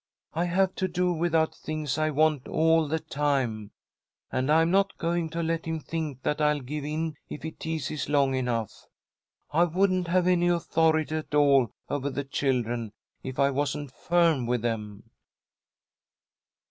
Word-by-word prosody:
"I 170 +2 0
have 185 +2 +2
to 190 - 0
do 180 0 0
without 165 -1 +1
things 155 -2 -3
I 155 0 +2
want 155 -2 +2
all 160 0 +3
the 160 +3 0
time. 135 -9 -1 0.6
And 130 +3 0
I'm 165 +2 +4
not 195 +1 +2
going 170 -1 -1
to 165 +1 -3
let 165 0 -1
him 160 -1 -2
think 155 -4 -5
that 150 +1 0
I'll 150 -1 +2
give 145 +3 -5
in 155 +1 -3
if - - -7
he 160 - -4
teases 155 -3 -4
long 140 -2 +3
enough. 120 -4 -2 0.6
I 165 +4 +4
wouldn't 185 +1 +1
have 180 +1 +2
any 175 -1 +3
authority 160 -3 +2
at 155 -1 -5
all 140 -5 +5 0.2
over 140 -1 -2
the 140 +1 -3
children 120 -5 -1 0.3
if 130 0 -6
I 140 0 +3
wasn't 145 0 -2
firm 165 -8 +2
with 120 -1 0
them." 105 -3 -3
155 Hz, 160 wpm, -27 LUFS, 135-165 Hz, 0.6 s, all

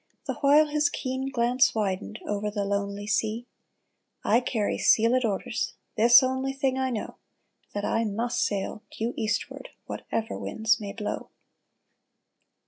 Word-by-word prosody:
The - - -2
while 290 +2 +6
his 300 -1 +1
keen 260 -1 -3
glance 245 -1 +2
widened 210 0 -2
Over 210 0 -2
the 205 -1 -2
lonely 200 0 -2
sea: 220 +3 0 0.4
" - - -49
I 235 - +7
carry 230 -4 -1
sealed 235 +3 +4
orders. 220 +2 -2 0.2
This 240 +4 +7
only 260 +1 -1
thing 270 -1 0
I 260 0 +1
know. 230 -4 -4 0.6
That 205 0 -1
I 225 - +1
must 225 +3 -1
sail 205 +1 -2 0.2
due 230 +2 -1
eastward 215 0 -3 0.2
Whatever 225 +1 -4
winds 220 +1 +1
may 205 -2 -5
blow 210 +1 -5
225 Hz, 140 wpm, -27 LUFS, 210-255 Hz, 0.6 s, I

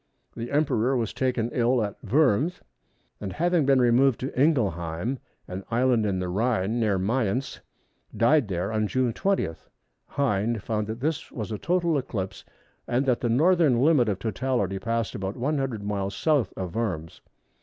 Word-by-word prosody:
The 115 +1 -5
Emperor 135 -4 +1
was 115 -3 -2
taken 125 -3 -1
ill 120 -1 +2
at 100 -1 -3
Worms, 145 - +2 0.6
and 100 -2 -5
having 170 -3 +1
been 135 -1 +5
removed 125 +1 +4
to 130 - -3
Ingelheim, 110 - 0 0.3
an 95 +2 -6
island 120 -2 +2
in 95 -2 0
the 90 0 -2
Rhine, 110 +2 0
near 105 -4 +2
Mayence, 115 +5 -1 0.6
died 120 +3 +4
there 95 +1 -2
on 110 -1 0
June 125 0 0
20. 195 - 0 0.6
Hind 115 -5 0
found 105 -2 -2
that 110 +2 -5
this 155 +1 -2
was 110 -2 -5
a 105 - -3
total 170 -4 +1
eclipse, 105 -8 -5 0.4
and 125 +3 +1
that 125 -3 +1
the 120 - 0
northern 155 0 +4
limit 135 -4 +4
of 100 - -1
totality 105 -2 -1
passed 115 0 -2
about 95 -2 -4
100 135 -4 -1
miles 100 -1 -2
south 145 - +1
of 90 -3 -4
Worms. 90 -9 -3
115 Hz, 160 wpm, -26 LUFS, 100-135 Hz, 0.6 s, been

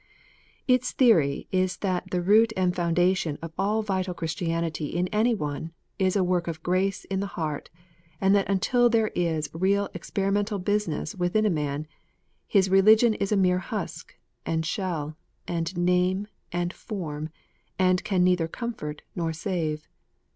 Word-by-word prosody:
Its 250 -1 +2
theory 165 - +3
is 185 -1 +1
that 185 -2 -2
the 180 -1 -1
root 220 +4 +5
and 180 -1 +1
foundation 175 -2 +1
of 165 0 -8
all 210 +4 0
vital 185 -3 -2
Chris 165 -2 -3
tianity 165 -3 -2
in 175 +2 0
any 225 +2 +2
one, 150 -1 -4 0.3
is 185 0 +2
a 195 - +3
work 180 -1 0
of 160 -1 -5
grace 185 +2 0
in 190 - 0
the 200 - -2
heart, 155 -3 -3 0.5
and 195 0 +4
that 200 -1 +2
until 240 +5 +3
there 225 -2 +2
is 160 -3 -1
real 195 +4 +1
experimental 200 +1 -1
business 200 -5 -1
within 185 +4 +1
a 210 - +3
man, 150 -2 -2 0.6
his 195 -2 +3
religion 215 +4 +6
is 200 -1 -2
a 210 - +3
mere 180 -1 +3
husk, 185 - -6 0.3
and 160 0 -1
shell, 160 -5 -3 0.3
and 170 +1 -2
name, 180 +2 +2 0.3
and 175 0 -1
form, 155 -7 -5 0.5
and 185 -1 +3
can 185 -3 +1
neither 180 -2 +3
comfort 165 -8 -5
nor 165 -2 -1
save. 160 -3 -3
180 Hz, 155 wpm, -26 LUFS, 165-200 Hz, 0.6 s, religion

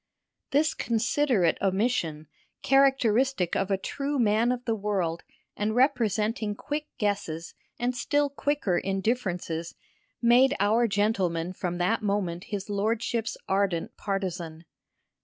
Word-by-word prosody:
This 295 +2 +2
considerate 230 - +1
omission, 190 -6 0 0.4
characteristic 270 -6 +3
of 195 - 0
a 195 - +2
true 280 +8 -3
man 230 0 +3
of 250 0 -3
the 230 - +1
world 195 -6 -1 0.3
and 215 +1 -1
representing 225 -4 +1
quick 300 +6 -4
guesses 200 -6 -2 0.2
and 245 +1 -1
still 290 +3 +1
quicker 280 -9 0
indifferences, 190 -5 -2 0.4
made 250 +3 +5
our 220 +4 +3
gentleman 190 -5 0
from 175 -1 -3
that 185 +6 +1
moment 200 -4 -1
his 200 -2 -5
lordship's 225 +2 -1
ardent 190 -3 0
partisan. 175 -5 -4
210 Hz, 115 wpm, -27 LUFS, 185-245 Hz, 0.4 s, made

